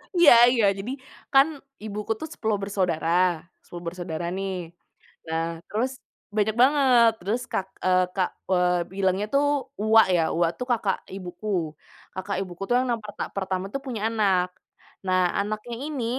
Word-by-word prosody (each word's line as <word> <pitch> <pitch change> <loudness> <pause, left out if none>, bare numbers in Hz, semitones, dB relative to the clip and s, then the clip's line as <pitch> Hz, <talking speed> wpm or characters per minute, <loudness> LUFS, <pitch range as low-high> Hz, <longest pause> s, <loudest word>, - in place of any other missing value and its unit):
Iya 345 -4 +8 0.2
iya, 235 -4 +3
jadi 205 +6 -5 0.4
kan 270 +2 +7 0.4
ibuku 210 0 -4
tuh 315 - -5
10 220 -2 -1
bersaudara 185 -5 -1 0.6
10 175 0 -10
bersaudara, 170 -1 -4
nih. 195 0 -2 0.7
Nah 160 0 -1 0.3
terus 235 +5 -1 0.5
banyak 215 0 +2
banget. 260 -4 +5
Terus 205 +7 -1
kak 190 - 0 0.2
eee, 185 0 +4
kak 185 -2 0 0.2
eee, 180 -1 +2
bilangnya 195 +1 0
tuh 280 +1 +4 0.4
uwak 220 0 +6
ya, 165 - +2
uwak 170 0 +2
tuh 250 - -4
kakak 215 -5 +1 0.2
ibuku. 180 +1 -8 0.7
Kakak 190 +2 -3
ibuku 180 -1 -7
tuh 245 - +2
yang 255 - +1
nak 235 - 0
perta 205 - -6
pertama 190 -1 -2
tuh 275 - -1
punya 240 -5 -4
anak. 195 -5 +2 0.6
Nah 185 0 +3 0.2
anaknya 215 +3 -4
ini 290 -6 -3
200 Hz, 150 wpm, -25 LUFS, 185-230 Hz, 0.7 s, Iya